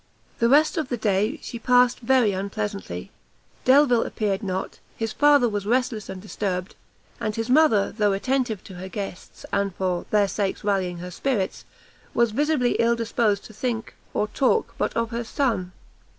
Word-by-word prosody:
The 235 - +3
rest 300 +5 +4
of 310 -5 -1
the 245 - -1
day 215 +5 +1
she 235 - -6
passed 250 0 +4
very 245 -3 +3
unpleasantly; 200 - -4 0.5
Delvile 255 -3 +5
appeared 205 -2 -1
not; 190 -2 -4 0.2
his 225 -1 -2
father 290 -4 +5
was 205 -2 -3
restless 240 -3 0
and 190 -1 -6
disturbed, 190 -2 -3 0.5
and 215 -1 -2
his 225 +2 -2
mother, 260 -9 +4
though 210 -1 +1
attentive 235 0 -1
to 190 - -11
her 185 +1 -7
guests, 195 -2 -7
and, 200 -2 0
for 185 -2 -2
their 205 -1 +3
sakes 195 0 -2
rallying 190 -4 0
her 180 +1 -7
spirits, 205 -1 -2 0.5
was 235 -1 +3
visibly 285 0 +1
ill 235 0 +3
disposed 230 -3 0
to 220 - -12
think 225 0 -3 0.2
or 210 - 0
to - - -25
talk 290 - +1
but - - +1
of 230 0 0
her 235 +1 -2
son. 225 -7 -1
220 Hz, 170 wpm, -24 LUFS, 195-245 Hz, 0.5 s, Delvile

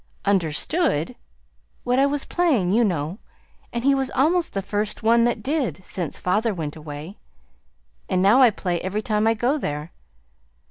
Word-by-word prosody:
"UNDERSTOOD!" 195 - 0 0.7
"What 250 +1 +1
I 275 - +5
was 285 0 -2
playing, 275 - +1
you 230 +4 +4
know. 175 -1 -1 0.5
And 235 0 -3
he 275 +1 +4
was 270 -1 0
almost 335 +6 +2
the 195 - -1
first 205 +2 -3
one 230 +1 +4
that 235 -3 -1
did 270 -10 -2
since 175 -5 -4
father 210 +4 0
went 155 -4 -4
away. 155 +4 -9 0.9
And 185 - +1
now 205 +8 +5
I 250 - +8
play 180 -5 -3
every 200 +4 -3
time 210 0 +1
I 225 - +3
go 255 +7 0
there. 150 - -4
215 Hz, 165 wpm, -23 LUFS, 180-255 Hz, 0.9 s, I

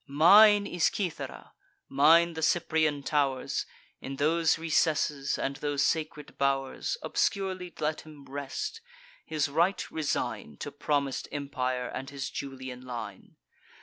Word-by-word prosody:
Mine 205 +8 +7
is 175 -4 0
Cythera, 185 -6 -3 0.3
mine 165 +5 +5
the 160 - -5
Cyprian 155 -3 +1
tow'rs: 140 -3 0 0.3
In 135 - -6
those 160 +3 +2
recesses, 150 -3 +1
and 135 0 -2
those 145 -1 -1
sacred 155 -2 -3
bow'rs, 140 - 0
Obscurely 185 -3 -1
let 155 +1 -1
him 150 -3 -14
rest; 140 - -5 0.4
his 155 -1 -1
right 170 +7 0
resign 145 - -3
To 145 - -6
promis'd 140 -2 -1
empire, 130 -3 -2
and 135 - -6
his 140 -1 -5
Julian 130 -2 -6
line. 115 -6 -8
145 Hz, 120 wpm, -29 LUFS, 135-165 Hz, 0.4 s, Mine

